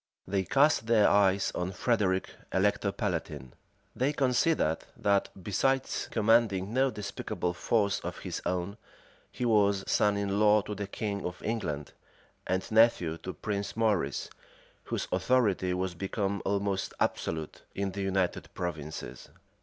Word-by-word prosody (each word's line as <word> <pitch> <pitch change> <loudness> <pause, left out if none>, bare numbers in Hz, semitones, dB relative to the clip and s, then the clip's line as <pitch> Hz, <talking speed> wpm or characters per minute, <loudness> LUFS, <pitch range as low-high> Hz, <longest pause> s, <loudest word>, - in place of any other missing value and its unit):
They 95 0 0
cast 140 - +3
their 110 -3 +5
eyes 100 -1 +3
on 90 +2 -3
Frederic, 95 -3 +1 0.2
elector 100 +1 +1
palatine. 80 - -4 0.4
They 135 +4 +1
considered 130 - +2 0.2
that, 100 -1 +2
besides 130 +8 0
commanding 110 -3 +2
no 135 +2 +3
despicable 100 -5 -3
force 100 +2 +1
of - - -6
his - - -5
own, 90 +3 -2 0.5
he 125 - -3
was 100 -4 +3
son 105 -1 +2
in 100 0 -1
law 105 0 +5
to 105 - -5
the 100 -1 -4
king 100 0 -3
of 90 0 -5
England, 80 -11 -3 0.5
and 95 +1 0
nephew 110 -8 +4
to 95 - -6
Prince 100 0 -3
Maurice, 105 -11 0 0.5
whose - - -3
authority 95 -2 +2
was 90 0 -2
become 100 +2 -2
almost 100 -1 -1
absolute 80 -2 -2
in 100 0 -1
the 100 - -5
United 95 -2 -1
Provinces. 75 -7 -5
100 Hz, 135 wpm, -29 LUFS, 95-110 Hz, 0.5 s, their